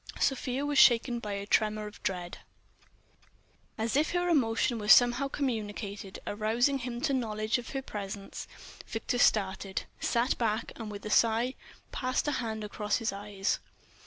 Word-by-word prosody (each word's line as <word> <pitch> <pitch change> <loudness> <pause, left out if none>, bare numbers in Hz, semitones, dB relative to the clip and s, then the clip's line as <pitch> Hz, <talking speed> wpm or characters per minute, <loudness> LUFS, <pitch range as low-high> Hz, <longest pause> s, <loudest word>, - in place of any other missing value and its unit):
Sofia 270 0 0
was 290 -1 +2
shaken 240 0 +5
by 210 -3 -4
a 200 0 -4
tremor 215 0 +1
of 210 - -10
dread.... 180 -2 -3 1.4
And 220 - -1
as 230 - -1
if 300 +4 +2
her 355 0 +1
emotion 235 -5 +2
were 210 - -5
somehow 245 +4 +6
communicated, 210 -7 -4
arousing 230 +6 +1
him 240 -1 -5
to 285 -1 +1
knowledge 220 -2 0
of 240 - -8
her 270 -1 -3
presence, 200 -3 -6 0.4
Victor 230 +2 -2
started, 195 -3 +2 0.2
sat 235 +2 +1
back, 225 -1 0
and 225 -2 -6
with 205 0 -8
a 210 - -3
sigh 230 +3 +3 0.4
passed 255 +2 -1
a - - +2
hand 220 -5 -3
across 210 0 -1
his 225 -3 -2
eyes. 200 -1 -2
225 Hz, 160 wpm, -30 LUFS, 210-250 Hz, 1.4 s, somehow